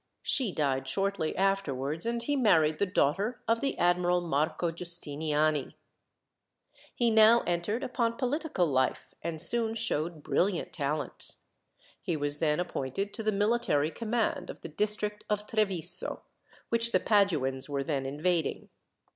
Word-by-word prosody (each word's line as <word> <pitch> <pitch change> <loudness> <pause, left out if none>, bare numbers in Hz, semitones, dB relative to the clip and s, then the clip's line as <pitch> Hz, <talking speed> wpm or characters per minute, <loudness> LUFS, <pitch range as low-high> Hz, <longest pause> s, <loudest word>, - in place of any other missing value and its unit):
She 250 -8 +2
died 135 -5 -1
shortly 195 +1 -1
afterwards, 165 - 0
and 235 0 -1
he 290 +4 0
married 160 - +3
the 200 - +2
daughter 195 - 0
of 230 0 +2
the 275 - -1
Admiral 175 0 +2
Marco 165 +1 -1
Giustiniani. 155 -3 -1 1.2
He 235 -2 +2
now 220 +2 +6
entered 175 +8 -1
upon 235 -3 -1
political 280 - 0
life, 130 -4 -1
and 165 -2 -4
soon 225 +5 +3
showed 170 -8 -1
brilliant 185 -1 0
talents. 150 -1 -3 0.6
He 165 - -2
was 145 0 +1
then 150 -1 +1
appointed 180 +3 -3
to - - -2
the 215 0 +1
military 205 -8 +1
command 230 +2 -2
of - - -8
the - - -7
district 210 +4 -2
of 210 0 -1
Treviso, 185 -5 -1 0.5
which 230 0 +1
the - - +5
Paduans 150 - +1
were 140 -1 -1
then 135 -3 -2
invading. 160 +3 -1
180 Hz, 140 wpm, -29 LUFS, 150-215 Hz, 1.2 s, now